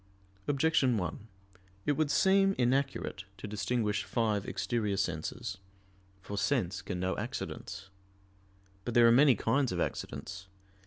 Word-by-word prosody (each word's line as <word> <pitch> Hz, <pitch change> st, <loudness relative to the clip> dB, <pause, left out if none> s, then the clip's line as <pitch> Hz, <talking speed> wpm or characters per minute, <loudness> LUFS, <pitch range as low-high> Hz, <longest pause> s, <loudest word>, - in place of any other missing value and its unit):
Objection 140 Hz, -4 st, +3 dB
1: 90 Hz, +3 st, -4 dB, 0.6 s
It -, -, +3 dB
would 150 Hz, +1 st, +1 dB
seem 195 Hz, +5 st, +4 dB
inaccurate 130 Hz, -6 st, 0 dB
to -, -, -7 dB
distinguish 105 Hz, +1 st, -1 dB
five 110 Hz, -4 st, 0 dB
exterior 105 Hz, -5 st, -1 dB
senses. 100 Hz, +4 st, -3 dB, 0.6 s
For 100 Hz, +1 st, -4 dB
sense 95 Hz, -10 st, 0 dB
can 95 Hz, -1 st, -4 dB
know 95 Hz, +1 st, 0 dB
accidents. 95 Hz, +1 st, -6 dB, 0.9 s
But 120 Hz, -, -4 dB
there 120 Hz, -1 st, +7 dB
are -, -, +7 dB
many 135 Hz, +1 st, +6 dB
kinds 130 Hz, +6 st, +1 dB
of 90 Hz, -, -2 dB
accidents. 95 Hz, +6 st, -4 dB
110 Hz, 125 wpm, -31 LUFS, 95-135 Hz, 0.9 s, there